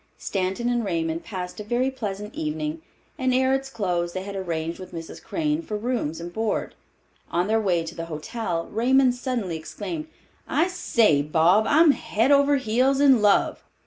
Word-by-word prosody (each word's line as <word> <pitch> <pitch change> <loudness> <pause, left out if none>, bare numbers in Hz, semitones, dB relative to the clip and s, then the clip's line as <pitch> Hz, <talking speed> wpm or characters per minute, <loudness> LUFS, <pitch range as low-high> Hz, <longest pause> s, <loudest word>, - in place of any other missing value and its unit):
Stanton 195 +4 -2
and 240 -1 +1
Raymond 165 -4 -2
passed 180 -2 -6
a - - -4
very 245 +5 0
pleasant 210 -4 -5
evening, 155 +1 -3 0.4
and 260 -1 +1
ere 260 +1 +3
its 270 0 -1
close 175 -8 -1
they 185 - -4
had 200 0 -7
arranged 165 -3 -3
with 185 - -10
Mrs. 165 0 -8
Crane 310 -1 -1
for 215 -10 -4
rooms 215 -9 -2
and 175 +1 -7
board. 220 -1 -1 0.6
On 175 +1 +1
their 220 +2 +2
way 180 -5 +1
to 165 - -7
the 165 - -5
hotel, 170 +2 -3
Raymond 255 +3 +3
suddenly 245 -9 -3
exclaimed, 205 - -6 0.4
"I 350 - +2
say, 220 - +3
Bob, 165 +8 +3
I'm 310 +1 +6
head 235 -1 0
over 280 0 +5
heels 260 +2 +2
in 270 -5 +5
love!" 205 -1 +3
210 Hz, 175 wpm, -24 LUFS, 170-255 Hz, 0.6 s, I'm